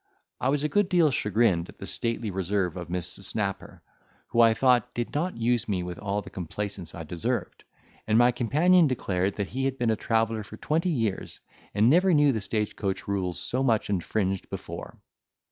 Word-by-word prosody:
I 130 - +1
was 145 +1 +1
a - - +2
good 205 +3 +1
deal 170 -5 +4
chagrined 105 -7 +1
at - - -13
the - - -7
stately 115 -2 -2
reserve 95 -1 -1
of 90 -2 -6
Mrs. 90 +2 -2
Snapper, 100 -1 -3 0.5
who, 120 - +3
I 115 -1 +6
thought, 125 -1 +2
did 120 0 -3
not 170 +2 -1
use 115 0 +1
me 95 -3 0
with 90 0 -6
all 100 0 -2
the - - -11
complaisance 95 +1 -5
I 85 - -6
deserved; 80 +1 -3 0.4
and 110 0 +3
my 120 +1 +6
companion 155 +9 +4
declared 95 -7 -1
that 100 -2 -3
he 135 +2 -2
had 135 0 -1
been 120 -3 +1
a - - +2
traveller 115 0 0
for 100 - -11
twenty 165 +4 0
years, 115 - -2 0.4
and 105 +2 +4
never 180 +6 +5
knew 145 -1 +5
the 110 -4 -2
stage 105 +1 -2
coach 95 -2 -3
rules 95 -3 -2
so 130 - -2
much 115 -6 +1
infringed 95 0 -1
before. - - -7
110 Hz, 195 wpm, -27 LUFS, 95-130 Hz, 0.5 s, I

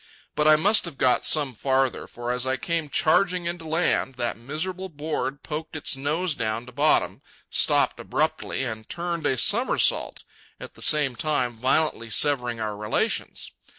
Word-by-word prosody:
But 150 - +1
I 155 - +8
must 200 +8 +3
have 165 -5 -7
got 125 -2 +2
some 145 -4 +2
farther, 130 +2 0
for 120 0 -5
as 125 +1 -1
I 130 0 0
came 165 +1 -2
charging 180 +4 +2
in 170 +1 -3
to 160 - -9
land, 160 -4 0
that 120 -1 -2
miserable 175 +10 -4
board 145 -3 -4
poked 160 +1 -6
its 150 - 0
nose 155 +6 -1
down 115 -2 -3
to 125 - -12
bottom, 145 +5 +1 0.3
stopped - - +2
abruptly, - - -1
and 110 -3 -6
turned 170 -1 -2
a 130 - +1
somersault, 230 - +2 0.4
at - - -9
the - - -13
same 145 -5 +2
time 125 -4 -1
violently 130 0 0
severing 125 -1 0
our 105 -1 -3
relations. 105 +1 -2
145 Hz, 165 wpm, -25 LUFS, 125-160 Hz, 0.4 s, I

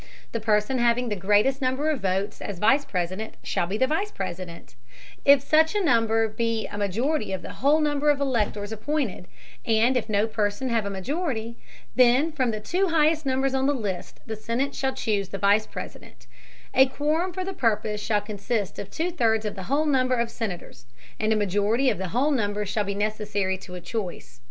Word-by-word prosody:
The 230 - -2
person 215 +3 +1
having 240 +1 +2
the 210 - -1
greatest 205 +8 +2
number 265 +4 +1
of 295 - -2
votes 195 +2 -1
as 200 - -5
Vice 265 +10 +3
President, 185 +4 -3
shall 170 - -1
be 200 +4 -2
the 260 - +3
Vice 320 +9 -1
President, 180 - -7 0.5
if 280 -1 +7
such 315 +6 +3
number 225 - +3
be 225 0 -1
a - - -7
majority 215 - -1
of 185 -2 -4
the - - -7
whole 290 +4 +4
number 295 -1 +1
of 290 -1 +3
Electors 215 -6 -1
appointed, 220 -4 -2 0.4
and 230 +3 +3
if 235 -3 -1
no 205 0 +2
person 215 +3 -1
have 225 -3 0
a - - -2
majority, 235 - -3 0.4
then 255 +5 +4
from 260 -5 0
the 215 -1 -2
two 365 - 0
highest 315 -2 +2
numbers 265 0 +1
on 265 0 +1
the 285 - +2
list, 200 -7 -5
the 220 - -4
Senate 235 +6 -2
shall 265 -1 -1
choose 200 -4 -1
the 195 - -4
Vice 200 +2 +3
President; - - -9 0.5
a 265 0 +6
quorum 305 +7 0
for 370 +1 -4
the 385 - -4
purpose 215 - 0
shall 210 -1 +1
consist 205 0 -3
of 200 - -6
two 330 - -2
thirds 225 -9 +1
of 210 - -2
the 190 +1 -8
whole 290 +3 +2
number 255 -3 +2
of 235 -1 -1
Senators, 185 - -6 0.3
and 215 0 +1
a - - +4
majority 210 +6 +2
of - - -4
the 190 - -2
whole 255 - +1
number 210 -5 0
shall 205 +2 -1
be 200 0 -3
necessary 205 -2 -1
to 185 -1 -10
a - - -5
choice. 175 - -6
225 Hz, 200 wpm, -25 LUFS, 205-270 Hz, 0.5 s, if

